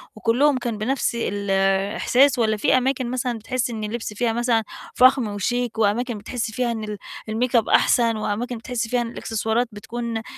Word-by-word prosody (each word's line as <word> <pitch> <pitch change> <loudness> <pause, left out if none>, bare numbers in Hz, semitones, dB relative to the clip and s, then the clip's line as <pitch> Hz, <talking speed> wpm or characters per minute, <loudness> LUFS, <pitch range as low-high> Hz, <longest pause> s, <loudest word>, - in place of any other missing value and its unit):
وكُلّهم 250 +7 +2
كان 235 -3 -3
بنَفس 240 +2 -1
الإحساس، 200 +6 +2
والّا 220 -2 +2
في 215 - +3
أماكن 255 -1 0
مثلًا 250 -2 -2
بتحسي 245 +1 -2
إن 220 -2 -5
اللبس 220 0 -4
فيها 230 +2 0
مثلًا 235 -1 +1 0.3
فخم 255 -1 +5
وشيك، 230 +4 -2
وأماكن 225 +2 +1
بتحسي 220 +1 -4
فيها 245 -1 0
إن 225 -1 -4
ال 210 -1 -5 0.3
الMake-up 235 0 +1
أحسن، 230 -2 +3
وأماكن 230 +3 -3
بتحسي 230 0 -3
فيها 245 0 +1
إن 235 - -3
الإكسسوارات 225 +1 -1
بتكون 230 +2 -5
أ 220 - -5
230 Hz, 170 wpm, -23 LUFS, 215-245 Hz, 0.3 s, فخم